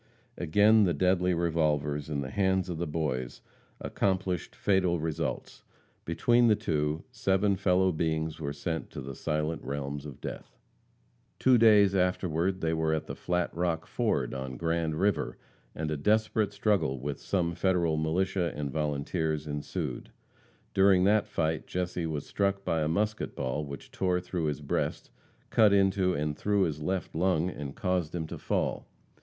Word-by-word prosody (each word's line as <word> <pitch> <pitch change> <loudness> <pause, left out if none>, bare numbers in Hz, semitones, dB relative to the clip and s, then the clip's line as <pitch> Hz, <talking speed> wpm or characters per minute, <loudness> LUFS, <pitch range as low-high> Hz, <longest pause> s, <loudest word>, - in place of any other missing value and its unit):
Again 105 +6 +4
the 85 -4 +1
deadly 90 +2 +2
revolvers, 75 -3 0
in 70 -2 -1
the 65 -1 -5
hands 95 -2 +1
of 85 -2 -4
the 85 - -1
boys, 70 -6 -3 0.4
accomplished 95 -3 -1
fatal 90 -4 +2
results. 80 0 -3 0.4
Between 120 +8 +3
the 110 - +5
two, 80 -6 -1
seven 100 -4 +1
fellow 95 0 +2
beings 80 -1 -1
were 70 -2 -3
sent 80 +3 -4
to - - -7
the 70 +1 -6
silent 75 +4 -2
realms 70 +1 -4
of 70 - -10
death. - - -8 0.8
Two 130 -2 +4
days 105 -3 +6
afterward 90 -1 0
they 80 0 +1
were 80 -1 +1
at 80 - -3
the - - -6
Flat 90 -1 -2
Rock 85 -1 -1
Ford, 95 - -1
on 65 -1 -5
Grand 80 0 -1
river, 100 -4 0 0.4
and 75 0 -3
a 75 - -1
desperate 105 +4 +1
struggle 100 -10 +1
with 70 +2 -4
some 85 -3 0
Federal 85 -4 +1
militia 85 +3 0
and 75 -2 -3
volunteers 75 +1 -1
ensued. 75 -1 -4 0.6
During 95 -2 +5
that 105 +2 +3
fight 80 -1 -1
Jesse 90 -2 -2
was 75 -3 -3
struck 100 0 -1
by 80 -1 +1
a 75 - +1
musket 105 +6 -1
ball 65 +4 -2
which 70 -1 -9
tore 90 -1 0
through 90 -2 -3
his 75 -3 -2
breast, - - -2 0.4
cut 110 -2 +5
into 95 -2 +3
and 75 0 -1
through 100 +2 +1
his 75 -4 -2
left 90 +3 -2
lung, 90 0 +1
and 70 -3 -7
caused 90 -3 -1
him 80 -2 -2
to - - -7
fall. - - -1
85 Hz, 160 wpm, -29 LUFS, 75-95 Hz, 0.8 s, days